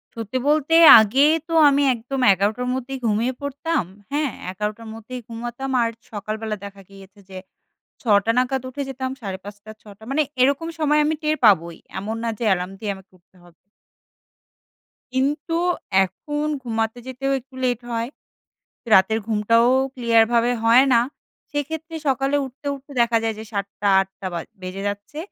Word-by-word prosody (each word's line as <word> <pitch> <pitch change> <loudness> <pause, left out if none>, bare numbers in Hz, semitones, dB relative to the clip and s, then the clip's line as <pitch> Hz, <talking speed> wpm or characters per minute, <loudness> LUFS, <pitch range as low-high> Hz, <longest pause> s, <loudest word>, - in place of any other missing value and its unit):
সত্যি 230 +2 -4
বলতে, 300 +1 +2 0.3
আগে 220 +6 +2 0.3
তো 330 - -5 0.2
আমি 285 0 +2
একদম 250 +4 -5
১১ 200 +2 +2
টার 250 0 -3
মধ্যেই 260 +1 -4
ঘুমিয়ে 225 +4 0
পড়তাম। 285 - -2 0.3
হ্যাঁ? 295 0 0 0.2
১১ 210 +3 -2
টার 230 -1 -11
মধ্যেই 240 +3 -8
ঘুমাতাম। 240 +3 -5
আর 230 - +1 0.2
সকালবেলা 215 +1 -4
দেখা 200 0 -10
গিয়েছে 195 +1 -16
যে 190 - -9 0.6
৬ - - -23 0.2
টা 230 - +3
নাগাদ 255 +1 +1
উঠে 280 +2 -6
যেতাম 260 0 -4
৫ঃ৩০ 205 +2 -8
৬ - - -31
টা। 220 - -17
মানে 310 +3 +2 0.2
এরকম 280 +5 +2
সময় 300 -1 +3
আমি 315 +1 +1
টের 305 0 +1
পাবই। 170 -5 +3 0.2
এমন 215 +3 -4
না 230 - -1
যে - - -3
এলার্ম 180 +1 -3
দিয়ে 210 -1 -3
আমাকে 190 0 -17
উঠতে 180 +2 -36
হবে। 175 - -19 1.6
কিন্তু 290 +5 -1 0.5
এখন 295 - -5 0.2
ঘুমাতে 225 -1 -2
যেতেও 265 +1 -3
একটু 260 +1 -20
লেট 245 -2 +1
হয়। 230 0 -2 0.9
রাতের 195 +4 +4
ঘুমটাও 230 +2 +3 0.3
clear 235 -3 +4
ভাবে 235 +1 +3
হয়না। 245 +1 +5 0.5
সেক্ষেত্রে 320 +3 -4
সকালে 270 +2 +1
উঠতে, 265 +2 -11
উঠতে 280 +1 -13
দেখা 235 -1 +3
যায় 225 -1 -1
যে 220 - -7
৭ 200 -1 -2
টা 205 - +1
৮ 195 - -3
টা 190 - -5
বা 170 - -3 0.2
বেজে 185 +1 -6
যাচ্ছে, 205 +9 -7
235 Hz, 165 wpm, -22 LUFS, 210-270 Hz, 1.6 s, হয়না